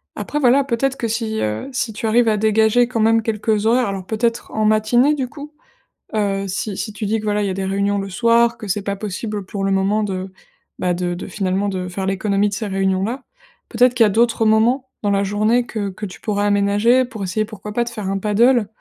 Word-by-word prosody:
Après, 295 - -3
voilà, 270 0 +4
peut-être 270 +1 -1
que 230 -4 -3
si, 220 -1 -2
heu, 105 - -2
si 245 -2 -1
tu 220 +1 -4
arrives 230 +1 +3
à 215 - +1
dégager 220 +3 +3
quand 235 -3 -2
même 225 +1 +4
quelques 215 -1 -1
horaires 240 +1 +3
alors 195 -2 -5
peut-être 230 +3 -2
en 215 - -1
matinée 215 +6 +3
du 270 -4 -2
coup, 290 +3 -10 0.6
heu, 195 -2 0
si 195 +1 -3
si 215 - -4
tu 215 0 -5
dis 220 +1 0
que, 215 - -7
voilà, 210 0 0
il 200 - 0
y - - -1
a - - -2
des 190 +1 -3
réunions 200 +1 0
le 195 0 -5
soir, 235 +3 +3
que 215 -3 -8
c'est 200 +1 -1
pas 200 -1 -2
possible 210 0 -5
pour 195 0 -4
le 195 - +1
moment 195 +3 +1
de, 190 -2 -4 0.5
bah 180 -1 0
de 175 0 -2
de 175 - -6
finalement 195 0 -1
de 185 -2 -3
faire 190 +2 -4
l'économie 195 +1 +1
de 205 - -4
ces 215 +2 -3
réunions 190 -1 0
là. 250 +5 -3 0.4
Peut-être 245 +1 +3
qu'il 235 -2 +4
y - - +4
a - - +1
d'autres 225 +1 +2
moments, 235 +5 +3 0.2
dans 205 - +1
la 200 0 +2
journée 215 +5 +1
que 215 -4 -4
que 195 +3 -7
tu 185 - -9
pourrais 205 -1 -1
aménager 205 +5 +3
pour 220 -5 -7
essayer, 215 +4 -1
pourquoi 210 -1 -9
pas, 240 - +1
de 235 - -6
faire 215 -5 -5
un 195 - -1
paddle 220 +3 +3
215 Hz, 240 wpm, -20 LUFS, 195-235 Hz, 0.6 s, voilà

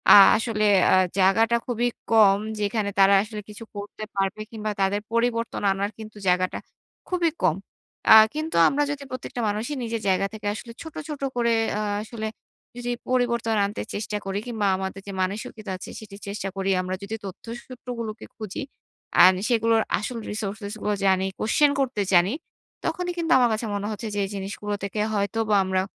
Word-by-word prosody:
আ - - +11 0.2
আসলে 220 -2 0 0.2
অ্যা - - +5 0.2
জায়গাটা 225 +5 +4
খুবই 245 0 0 0.2
কম, 205 -3 +6 0.2
যেখানে 205 0 0
তারা 195 +1 +7
আসলে 210 -1 -7
কিছু 210 +2 -9
করতে 205 +1 -7
পারবে 195 +2 -1
কিংবা 215 -1 -3
তাদের 195 +2 +1
পরিবর্তন 230 0 0
আনার 200 +2 -1
কিন্তু 215 -1 -10
জায়গাটা 180 0 +2 0.5
খুবই 355 -2 +2
কম। 170 -4 +4 0.5
অ্যা 220 - +11 0.2
কিন্তু 310 +2 -3
আমরা 290 +1 +2
যদি 285 -1 -5
প্রত্যেকটা 255 -1 -5
মানুষই 220 +8 -2
নিজের 230 -1 -3
জায়গা 190 +1 +2
থেকে 215 -2 -9
আসলে 230 +2 -8
ছোট, 320 -2 -9
ছোট 300 -3 -6
করে 235 -1 +2 0.2
অ্যা 210 - -1 0.2
আসলে 220 0 -5 0.5
যদি 245 0 -3 0.2
পরিবর্তন 235 -3 +1
আনতে 205 +2 -4
চেষ্টা 210 0 -3
করি 195 +1 -2
কিংবা 220 -4 -1
আমাদের 190 +1 -4
যে - - -4
মানসিকতা 205 +2 -4
আছে 185 - -9
সেটি 210 -2 -11
চেষ্টা 200 -1 -3
করি, 195 0 -1
আমরা 185 0 -3
যদি 210 +3 -4
তথ্য 195 0 -9 0.2
সূত্রগুলোকে 235 -3 -6
খুঁজি, 215 +3 -5 0.6
আর 180 +2 +10 0.2
সেগুলোর 225 -1 +3 0.2
আসল 235 +3 -4
resources 205 0 -4
গুলো 210 - 0
জানি, 190 0 +3
question 285 +7 +3
করতে 260 -6 0
জানি, 180 +5 +5 0.5
তখনই 355 0 -1
কিন্তু 335 -1 -1
আমার 245 -2 +4
কাছে 220 +2 -2
মনে 205 +1 -2
হচ্ছে 215 +2 -5
যে - - 0
এই - - -7
জিনিসগুলো 200 +1 -4
থেকে 200 +2 -3
হয়তো 205 +2 -1
বা 210 - +4
আমরা 185 0 +1
215 Hz, 175 wpm, -25 LUFS, 200-235 Hz, 0.6 s, আ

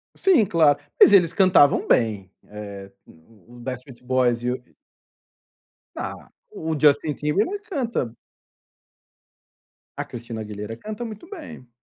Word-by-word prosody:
Sim, 370 - +4
claro, 155 -5 +3 0.2
mas - - +8
eles 180 -4 +5
cantavam 185 -7 +4
bem, 105 -5 +1 0.2
eh, 100 -2 -9
o 100 +7 -21
o - - -14
os - - -12
Backstreet 130 0 -7
Boys 125 -2 +1
e 125 - 0
o 125 0 -5 1.3
Ah, - - -4 0.4
o 160 -1 -3
Justin 145 +1 +3
Timberlake 165 - 0
ele 410 - -5
canta 285 - -3 1.8
A - - -3
Cristina 115 -2 -7
Aguilera 105 +1 -7
canta 215 - -6
muito 220 +6 -9
bem. 310 - -10
135 Hz, 130 wpm, -23 LUFS, -, 1.8 s, mas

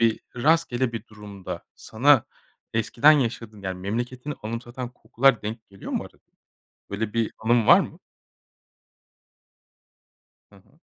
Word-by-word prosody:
bir 115 -1 +2 0.2
rastgele 130 -3 +2
bir 115 - -6
durumda 105 -3 -8
sana 130 +2 +3 0.5
eskiden 115 +7 +5
yaşadığın, 115 -6 -1
yani, 95 -1 -4
memleketini 120 +8 -3
anımsatan 120 +3 -5
kokular 125 0 +2
denk 110 +2 -6
geliyor 95 -1 -9
mu - - -1
arada? - - -15 0.7
Böyle 105 +1 -3
bir 115 -1 0
anın 115 0 +2
var - - +9
mı? - - -6 2.5
Hı - - -18
hı. 100 - -24
115 Hz, 120 wpm, -25 LUFS, 105-125 Hz, 2.5 s, var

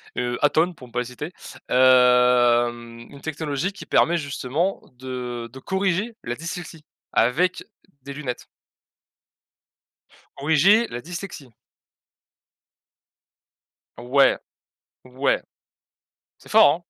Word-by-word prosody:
heu, 125 0 -2
Atol, 160 +4 +3
pour 125 -5 -13
ne - - -20
pas 125 - -2
les 125 - -2
citer, 150 +8 -7 0.4
hem, 125 -2 +4
une 140 -1 -13
technologie 155 +3 -3
qui - - -10
permet 170 +1 +3
justement 145 +4 -2
de 125 -2 -6
de 135 - -11
corriger 190 - -1
la 120 +1 -3
dyslexie, 165 -1 -7 0.3
avec 170 +10 +2 0.4
des 140 - -7
lunettes. 135 -4 -6 1.9
Corriger 160 +11 +4
la 120 - -5
dyslexie. 170 -4 -8 2.5
Ouais. 130 +3 +3 0.7
Ouais. 130 +2 0 1.0
C'est - - -18
fort, 145 +2 +6
140 Hz, 100 wpm, -23 LUFS, 125-165 Hz, 2.5 s, fort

